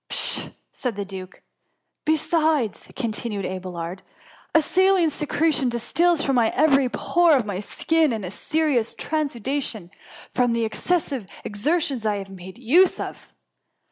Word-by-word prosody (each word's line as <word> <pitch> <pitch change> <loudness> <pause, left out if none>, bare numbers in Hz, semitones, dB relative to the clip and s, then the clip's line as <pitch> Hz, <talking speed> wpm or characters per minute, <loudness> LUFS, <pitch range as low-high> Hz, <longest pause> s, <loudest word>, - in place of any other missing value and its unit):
'' - - -60
" - - -60
Pshaw - - +1
r - - -15 0.2
said 245 -4 -4
the 200 0 -4
duke. 190 -1 -9 0.6
*^ - - -61
Besides,^ 310 - +1
continued 220 -5 -3
Abelard, 185 -1 -5
^' - - -26 0.2
a - - +8
saline 375 -1 +3
secretion 295 -2 +1
distils 310 +8 +1
from 270 -3 +2
every 270 +3 +3
pore 340 +4 +3
of 250 -5 +1
my 200 -3 -3
skin, 320 +8 +1
in 220 -3 -3
a 180 - -5
serous 295 -4 0
transudation, 270 - -2 0.4
from 245 -2 +2
the 230 -1 +1
excessive 270 - -1 0.2
ex 205 -1 -6
ertions 295 -7 +1
I 215 -1 +1
have 195 -1 -6
made 185 0 -10
use 305 +11 +4
of. - - -7
250 Hz, 155 wpm, -23 LUFS, 205-315 Hz, 0.6 s, a